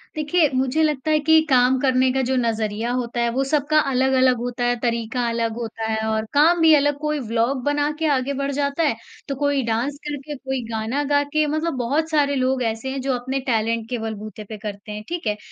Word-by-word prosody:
देखिए, 310 +1 +2
मुझे 260 +4 +1
लगता 300 -1 0
है 305 - +4
कि 320 +1 +5
काम 255 0 +4
करने 260 -1 +3
का 265 - +1
जो 265 - +1
नज़रिया 225 -1 -1
होता 240 -1 -2
है, 235 - +2
वो 265 +3 0
सबका 305 +1 +3
अलग-अलग 260 -1 +3
होता 245 +1 -3
है, 245 0 +2
तरीका 235 0 -1
अलग 230 -1 -1
होता 225 -1 -5
है 220 - 0
और 220 0 0
काम 320 +4 +5
भी 320 -1 +7
अलग 290 0 +2
कोई 300 0 -1
व्लॉग 235 +4 0
बना 290 +1 +1
के 320 - 0
आगे 260 +2 -1
बढ़ 275 0 -1
जाता 280 +3 -1
है, 290 -7 +2 0.3
तो 275 - -3
कोई 285 0 0
डांस 235 +5 -1
करके, 295 0 -5
कोई 265 -1 -4
गाना 225 +6 -1
गा 285 0 +4
के 305 +2 0
मतलब 310 +3 -1
बहुत 285 +7 0
सारे 290 -3 +2
लोग 260 -1 +1
ऐसे 225 +4 -6
हैं, 270 0 -3
जो 270 0 0
अपने 255 +2 -2
टैलेंट 230 -1 0
के 250 - -2
बलबूते 215 -1 -6
पे 215 - -6
करते 205 0 -7
हैं, 210 0 -6
ठीक 345 -7 -4
है। 210 0 0
260 Hz, 220 wpm, -22 LUFS, 230-290 Hz, 0.3 s, भी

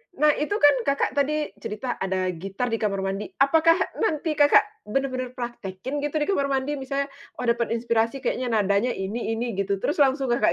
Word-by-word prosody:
Nah, 300 0 +5
itu 305 +8 -1
kan, 290 -7 +6
Kakak 280 0 +1
tadi 300 +2 0
cerita 235 +4 -4
ada 185 -1 -1
gitar 195 +8 -4
di 225 - +1
kamar 200 -2 -1
mandi, 195 +2 -2
apakah 320 +4 +4 0.2
nanti 320 -6 0
Kakak 290 0 +6 0.2
benar-benar 255 +1 -2
praktekin 240 +1 -5
gitu, 295 +1 -3
di - - +4
kamar 280 -8 +1
mandi? 275 +1 -1
Misalnya, 275 +1 -2 0.3
"Oh, - - -5
dapat 235 -1 +1
inspirasi 235 +3 0
kayaknya, 250 +1 -1
nadanya 210 +1 +1
ini-ini." 225 +2 -3
gitu, 200 0 +1
terus 295 - -1
langsung 270 -2 +3
kayak 240 - +2
250 Hz, 175 wpm, -25 LUFS, 215-280 Hz, 0.3 s, kan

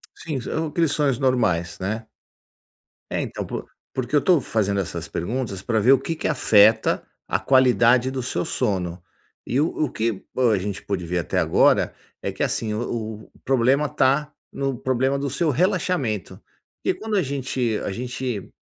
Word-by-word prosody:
Sim, 150 -6 -4
são 160 +6 -2
aqueles 160 -1 +1
sonhos 140 -4 +1
normais, 100 -11 +1
né? 110 +4 -3 1.0
É - - -1
então - - -4
por - - -5 0.3
porque 130 +1 -4
eu - - +8
estou 175 -1 +4
fazendo 100 -4 0
essas 85 -3 -4
perguntas 100 +1 -3
pra 110 0 0
ver 125 +6 +5
o 135 - +6
que 165 - -3
que - - -3
afeta 110 -6 +4 0.3
a - - +1
qualidade 125 -1 +4
do 130 -1 -3
seu - - -2
sono. 90 -7 -1 0.5
E 130 +4 +1
o 160 - +3 0.2
o 140 - -2
que 110 -3 -2
a 120 -6 +3
gente 100 +1 -4
pôde 95 -3 -3
ver 90 +1 -1
até 85 - -1
agora, - - +3 0.3
é - - -2
que - - -4
assim 110 -2 -1
o 110 -1 -4
o - - -21
problema 135 +3 +3
está 145 +3 +1 0.2
no 135 -2 -2
problema 130 +2 +1
do 140 - -2
seu 165 +1 +1
relaxamento. 165 - 0 0.4
Porque - - 0
quando 220 -1 -3
a 190 - +3
gente 130 -5 -1
a - - -2
gente 125 -1 -4
125 Hz, 175 wpm, -23 LUFS, 105-140 Hz, 1.0 s, eu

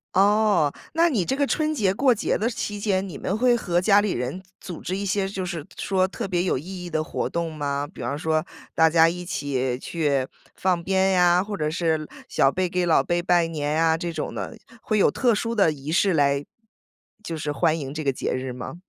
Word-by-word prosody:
哦， 200 -5 +4 0.2
那 335 +2 +4
你 210 - 0
这 265 - 0
个 285 +1 +1
春 310 +2 0
节 200 -8 +2
过 255 +3 +3
节 - - 0
的 220 +3 0
期 205 -3 -4
间， 195 -2 0
你 165 -7 -7
们 200 - -2
会 245 +1 +4
和 175 -7 0
家 200 +1 +5
里 205 -1 0
人 125 +9 -3 0.2
组 175 - -7
织 185 - -3
一 200 +1 -3
些 195 0 0
就 195 -1 -4
是 170 -5 -5
说 190 -1 +1
特 215 +4 -5
别 180 -2 0
有 185 - +1
意 180 +5 -7
义 - - -6
的 155 -1 -1
活 - - -3
动 170 -1 -3
吗？ 145 -1 -2
比 - - -14
方 130 +4 -2
说 155 +1 0 0.3
大 160 0 +5
家 165 0 +5
一 180 +1 -5
起 135 -7 -2
去 140 -2 -1 0.3
放 180 -2 0
鞭 190 +2 +2
呀， 180 -1 +4
或 205 0 -5
者 150 -1 -1
是 160 -2 -1 0.2
小 135 - +3
辈 185 +4 -1
给 180 0 0
老 165 - +4
辈 175 0 0
拜 175 -1 +3
年 150 -2 -2
啊， 160 0 +3
这 170 0 -3
种 155 - -4
的。 230 - -6 0.2
会 215 - 0
有 200 - +4
特 245 -4 +2
殊 230 +2 -2
的 200 -7 +4
仪 145 +1 -7
式 190 +3 +3
来 140 -2 +2 0.8
就 170 -6 -5
是 150 -1 -3
欢 155 +3 +1
迎 140 -3 -5
这 155 - -4
个 140 -3 0
节 - - -3
日 130 0 -3
吗？ 125 +6 -7
175 Hz, 245 characters per minute, -24 LUFS, 155-195 Hz, 0.8 s, 家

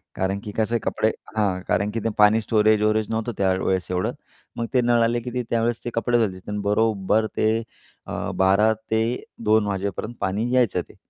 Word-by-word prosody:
कारण 95 +1 -1
की 105 - -6
कसं 110 +1 +1
आहे - - +2
कपडे 110 - +1 0.3
हां, 100 -4 +1
कारण 100 +1 +1
की 115 - -2
ते - - +2
पाणी 105 +1 +5
स्टोरेज-वोरेज 110 0 +2
नव्हतं 115 +1 -2
त्यावेळेस 95 -1 +1
एवढं. 90 0 0 0.5
मग 115 - -1
ते 125 - +4
नळ 120 -1 +3
आले 120 +1 +1
की 125 +1 -6
ते 125 -1 -1
त्यावेळेस 115 0 0
ते - - -1
कपडे 120 +1 +2
धुवायचे. 100 -5 0
तर 105 - -3
बरोबर 110 0 +2
ते 110 - +3 0.6
अ, - - -3
12:00-2:00 110 +2 +1
वाजेपर्यंत 100 +3 -3
पाणी 105 +6 -1
यायचं 120 -8 +2
ते - - -16
110 Hz, 180 wpm, -23 LUFS, 100-115 Hz, 0.6 s, पाणी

